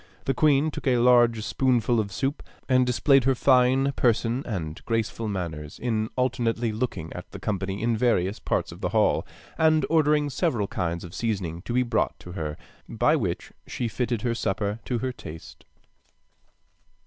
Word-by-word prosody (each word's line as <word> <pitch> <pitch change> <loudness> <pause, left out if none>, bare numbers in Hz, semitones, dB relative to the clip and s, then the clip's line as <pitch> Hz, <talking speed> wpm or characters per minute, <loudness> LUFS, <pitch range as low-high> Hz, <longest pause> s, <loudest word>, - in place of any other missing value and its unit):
The 135 - +1
queen 150 +2 +3
took 145 - -6
a 125 -2 +4
large 120 -2 +4
spoonful 120 -2 +1
of 100 -2 -2
soup, 135 +8 -2 0.3
and 130 -1 +3
displayed 135 +1 +3
her 135 -1 +3
fine 130 +1 +4
person 120 -1 +1
and 80 -8 -4
graceful 115 0 -1
manners, 80 -7 -5
in 110 -2 -1
alternately 120 -2 0
looking 105 -8 -3
at 90 - -8
the 100 - -9
company 100 0 -3
in 115 0 +2
various 105 -4 +1
parts - - -1
of - - -12
the - - -1
hall, - - +2 0.3
and 155 -1 +4
ordering 150 -2 +3
several 130 - 0
kinds 85 -3 -3
of 85 -1 -9
seasoning 95 -8 -2
to 120 - -3
be 125 +1 +3
brought 110 -10 0
to 90 - -10
her, 75 -4 -4 0.3
by - - +2
which - - -3 0.2
she 120 - -3
fitted 120 -1 -2
her 120 -2 +1
supper 105 -1 -2
to 125 - -1
her 130 - -1
taste. 80 -7 -11
115 Hz, 170 wpm, -26 LUFS, 100-130 Hz, 0.3 s, a